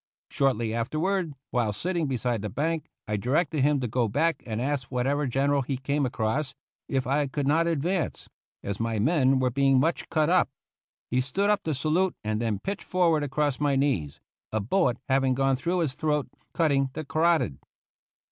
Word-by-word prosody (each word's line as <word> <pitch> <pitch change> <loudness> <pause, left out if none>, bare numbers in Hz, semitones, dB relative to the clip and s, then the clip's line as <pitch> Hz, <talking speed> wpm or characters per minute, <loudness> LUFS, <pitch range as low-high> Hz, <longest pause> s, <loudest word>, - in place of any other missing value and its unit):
Shortly 120 -5 +1
afterward, 155 +7 -1 0.2
while 120 -4 +1
sitting 170 - -1
beside 125 -4 -1
the 105 - -3
bank, 155 - -2 0.2
I 105 0 -1
directed 140 - 0
him 145 +1 +3
to 125 - -1
go 120 +1 +1
back 145 +6 +1
and 110 -1 -3
ask 135 0 -1
whatever 140 +3 0
gen 135 +3 +1
eral 140 -1 +2
he 135 +1 -2
came 140 +1 0
across 125 +5 -1 0.3
if 135 -2 0
I 140 +3 +1
could 140 +1 -2
not 160 +4 +3
advance, 170 +2 -1 0.4
as 100 -1 -4
my 115 -1 -1
men 135 +2 +3
were 130 -1 +1
being 135 0 +3
much 160 +5 0
cut 155 -2 +2
up. 180 -3 +3 0.6
He 125 +1 +2
stood 195 +11 +1
up 210 -1 +1
to 155 -2 0
salute 165 +6 +1
and 110 +1 -1
then 110 -3 0
pitched 195 - -4
forward 170 -4 +2
across 145 -1 0
my 145 -1 +2
knees, 90 - 0 0.3
a 110 - 0
bullet 125 - +1
having 135 -1 +2
gone 135 0 +2
through 170 +7 -1
his 150 -6 0
throat, 150 0 0 0.2
cutting 140 -5 +2
the 155 +1 -5
carotid. 160 - +1
140 Hz, 185 wpm, -27 LUFS, 125-155 Hz, 0.6 s, him